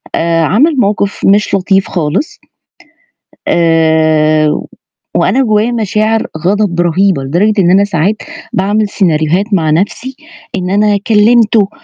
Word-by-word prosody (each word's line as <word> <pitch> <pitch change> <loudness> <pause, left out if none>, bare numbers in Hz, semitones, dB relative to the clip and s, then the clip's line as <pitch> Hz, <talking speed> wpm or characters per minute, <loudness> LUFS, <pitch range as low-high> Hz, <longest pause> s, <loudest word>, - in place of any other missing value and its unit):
آآ، 165 0 0
عَمَل 265 - +2
موقِف 200 -2 -1
مش 205 +1 +2
لطيف 195 0 0
خالص 175 - -3 1.1
آآ، 155 -2 +2 0.6
وأنا 270 - +1
جوّايا 215 0 +1
مشاعر 220 0 -1
غَضَب 185 0 0
رهيبة، 175 -3 +1
لدرجة 195 +9 0
إن 175 -1 +2
أنا 195 +2 +4
ساعات 200 +1 -1 0.4
باعمل 205 +2 0
سيناريوهات 170 0 0
مع 160 -4 +1
نَفْسي، 205 +10 -2 0.4
إن 180 -1 -4
أنا 205 +1 +1
كلّمته 220 -1 +3
195 Hz, 115 wpm, -11 LUFS, 165-210 Hz, 1.1 s, أنا